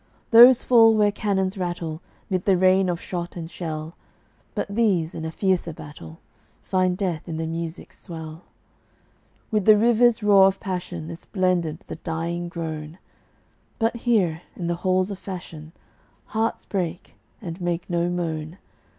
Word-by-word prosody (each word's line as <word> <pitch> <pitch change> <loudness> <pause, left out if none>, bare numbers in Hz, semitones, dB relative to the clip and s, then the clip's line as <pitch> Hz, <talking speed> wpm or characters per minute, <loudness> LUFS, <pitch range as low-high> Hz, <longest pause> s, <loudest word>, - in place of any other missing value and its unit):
Those 240 +2 +9
fall 225 -2 +6
where 210 -1 +3
cannons 195 -2 -1
rattle, 175 -3 -3 0.3
'Mid 185 -2 -2
the 195 -2 +4
rain 185 +1 +4
of 175 -1 -1
shot 175 -1 -5
and 165 -1 -7
shell; 160 -1 -5 0.6
But - - -2
these, 200 -6 +1
in 160 - -5
a 160 - -3
fiercer 180 -2 0
battle, 145 - -11 0.5
Find 185 -1 +1
death 175 -4 -3
in 160 - -3
the 160 - -2
music's 165 0 -6
swell. 160 0 -9 1.1
With 210 -3 +1
the 215 -1 +7
river's 235 0 +3
roar 200 -2 +7
of 195 0 -1
passion 180 -3 -5
Is 165 - -10
blended 180 -5 0
the - - -7
dying 170 +1 -3
groan; 160 -1 -6 0.8
But 225 +1 0
here, 195 -9 +1
in 175 - -5
the 175 - 0
halls 185 +1 +1
of 195 - -6
fashion, 170 -5 -8 0.6
Hearts 225 +1 -1
break, 180 -3 -4 0.3
and 175 -5 -7
make 175 0 -2
no 175 0 0
moan. 165 -1 -3
180 Hz, 150 wpm, -24 LUFS, 165-195 Hz, 1.1 s, Those